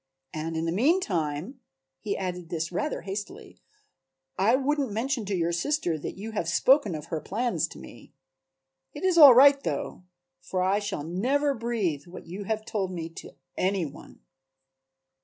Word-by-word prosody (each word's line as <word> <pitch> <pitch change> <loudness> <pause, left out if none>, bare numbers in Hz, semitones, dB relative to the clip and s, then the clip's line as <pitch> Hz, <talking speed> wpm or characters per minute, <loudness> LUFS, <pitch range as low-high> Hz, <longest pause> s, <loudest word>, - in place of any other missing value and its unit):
And 160 +1 -4
in 160 - -1
the 165 - 0
meantime," 200 - 0 0.4
he 200 +9 -3
added 180 -3 -4
this 165 -1 -3
rather 295 - -2
hastily, 200 +2 -7 0.8
"I 215 +6 +3
wouldn't 280 0 0
mention 235 +2 -2
to 195 0 -2
your 170 -1 0
sister 175 - 0
that - - -6
you 215 +3 -6
have 175 -6 -2
spoken 255 - +3
of 150 0 -7
her 160 -2 -2
plans 240 +5 -1
to - - -13
me. - - -13 0.8
It - - -7
is 370 -3 +3
all 280 -5 +11
right 280 +2 +7
though, - - -4 0.4
for 185 -1 -2
I 195 +2 +2
shall 205 -8 -4
never 260 - 0
breathe 215 - -2
what 175 - -10
you 190 +4 -7
have 215 +1 -2
told 195 -3 -2
me 165 -2 -5
to 165 - -11 0.2
any 190 -2 0
one." 140 - -12
195 Hz, 165 wpm, -27 LUFS, 170-250 Hz, 0.8 s, all